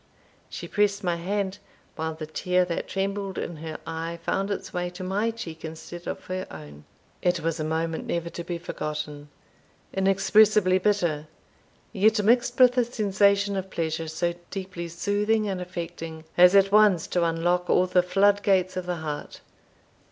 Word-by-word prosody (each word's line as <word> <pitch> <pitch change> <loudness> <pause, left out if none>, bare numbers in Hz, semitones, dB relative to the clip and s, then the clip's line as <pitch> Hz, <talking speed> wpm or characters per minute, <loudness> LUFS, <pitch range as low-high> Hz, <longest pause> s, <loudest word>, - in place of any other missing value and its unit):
She - - -7
pressed 205 -1 +1
my 175 -2 0
hand, 195 +2 -2 0.4
while 160 0 -3
the 160 0 -6
tear 180 +3 +1
that 170 -1 -3
trembled 195 0 -2
in 170 - -4
her 155 0 -6
eye 165 +1 -4
found 195 +1 -1
its 200 - -4
way 180 0 -2
to 180 +1 -8
my 200 +5 0
cheek 175 -8 -7
instead 165 +2 -8
of - - -5
her 185 0 -4
own. 75 -2 -11 0.4
It 175 -1 +1
was 165 0 -1
a - - -1
moment 160 +1 -2
never 170 0 -2
to 170 - -6
be 175 0 -4
forgotten 150 -3 -5 0.6
inexpressibly 195 0 +4
bitter, 175 -7 0 0.7
yet 210 +1 +3
mixed 240 +5 +3
with 250 0 +6
a - - +5
sensation 200 -3 +2
of 190 0 -3
pleasure 160 -2 -2
so 170 +2 -1 0.2
deeply 185 -3 -5
soothing 205 +5 0
and 190 -2 -2
affecting, 170 -3 -6
as 180 +2 +7
at 195 0 +5
once 210 -5 +5
to 175 - +1
unlock 175 +2 +1
all 180 - +4
the 180 0 +3
flood 200 +3 +3
gates 185 -2 +2
of 185 -1 -4
the 180 - -1
heart. 150 -1 -5
180 Hz, 165 wpm, -26 LUFS, 165-200 Hz, 0.7 s, as